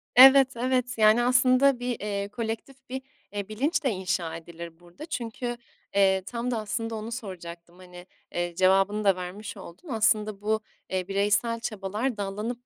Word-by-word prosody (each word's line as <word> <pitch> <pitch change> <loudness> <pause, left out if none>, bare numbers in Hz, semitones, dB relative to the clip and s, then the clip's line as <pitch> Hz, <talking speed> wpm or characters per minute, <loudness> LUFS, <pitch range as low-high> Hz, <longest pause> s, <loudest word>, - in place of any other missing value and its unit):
Evet, 265 +1 +10
evet. 250 0 0
Yani, 220 +2 +5
aslında 255 +1 +4
bir, 245 -1 -3
eee, 200 -1 -3
kolektif 235 +4 -6
bir, 260 +1 -4 0.3
eee, 205 -1 -3
bilinç 295 +8 0
de 270 - +2
inşa 185 -5 -2
edilir 170 0 -9
burada. 175 - -11
Çünkü, 240 -4 -4 0.4
eee, 190 -1 +4
tam 240 +3 -3
da 235 - 0
aslında 225 +2 -3
onu 220 +2 -6
soracaktım, 175 -6 -8
hani, 180 -1 -12 0.3
eee, 175 0 -2
cevabını 195 +3 +3
da 195 -2 +4
vermiş 185 +4 -7
oldun. 190 - -12
Aslında 215 -3 +1
bu, 215 +1 0 0.3
eee, 185 -1 -2
bireysel 205 +4 +1
çabalar 215 +3 -3
dallanıp 210 +5 -4
215 Hz, 155 wpm, -27 LUFS, 190-245 Hz, 0.4 s, Evet